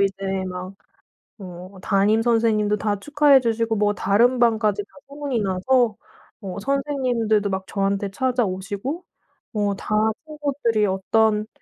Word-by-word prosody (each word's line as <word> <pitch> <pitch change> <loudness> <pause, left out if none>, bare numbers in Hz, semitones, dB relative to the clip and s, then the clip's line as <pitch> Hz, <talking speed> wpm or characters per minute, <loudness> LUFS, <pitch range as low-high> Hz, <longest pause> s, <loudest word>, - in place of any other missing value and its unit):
이제 195 -1 -1
막 185 +1 -7 0.7
어 185 0 -10
담임 205 +4 +2
선생님도 225 -3 +2
다 205 -1 -1
축하해 290 +1 +4
주시고 230 -1 0
뭐 205 0 +2
다른 235 +7 +3
반까지 220 -4 +2
다 - - -22 0.2
소문이 280 -3 -3
나서 210 +4 +1 0.4
어 195 -1 -6
선생님들도 250 -6 0
막 190 -1 -2
저한테 195 0 -1
찾아오시고 235 - -2 0.5
뭐 205 -2 0
다 215 - -3 0.3
친구들이 280 -8 0
어떤 210 +2 +1
215 Hz, 270 characters per minute, -22 LUFS, 195-245 Hz, 0.7 s, 축하해